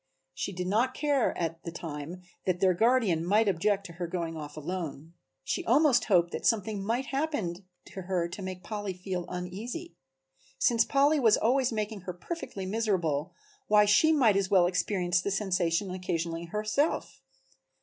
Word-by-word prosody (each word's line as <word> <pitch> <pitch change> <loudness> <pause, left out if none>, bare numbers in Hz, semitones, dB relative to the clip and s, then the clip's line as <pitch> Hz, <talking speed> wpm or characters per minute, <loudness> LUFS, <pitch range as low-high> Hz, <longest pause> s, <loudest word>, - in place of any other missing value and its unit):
She 140 - -3
did 180 -1 -4
not 230 +7 +1
care 290 -4 +1
at 165 -1 -3
the 170 - -5
time 165 +1 -7 0.2
that 180 -1 +1
their 185 -1 +4
guardian 220 -5 +2
might 210 +5 +3
object 200 +2 +1
to 170 - -9
her 175 +1 -4
going 170 -2 -3
off 150 -1 -8
alone. 160 -1 -5 0.3
She - - -2
almost 285 -6 +4
hoped 175 -4 +3
that - - -5
something 210 -3 +1
might 235 +6 -1
happen 270 - -2 0.2
to 190 - -8
her 180 -2 -1
to 175 +4 -8
make 185 -1 -6
Polly 205 -3 -4
feel 180 -1 -5
uneasy. 205 - -6 0.6
Since 230 -1 +3
Polly 285 +2 +3
was 225 -5 +5
always 255 +2 +2
making 215 -2 -3
her 180 0 -5
perfectly 195 - -6
miserable 185 -7 -1 0.3
why 210 0 +6
she 210 +10 +5
might 250 -10 +4
as 195 -1 +1
well 185 -3 +5
experience 180 -1 +1
the 200 - -2
sensation 190 -2 0
occasionally 170 -2 -3
herself. 215 - -1
190 Hz, 165 wpm, -29 LUFS, 175-225 Hz, 0.6 s, why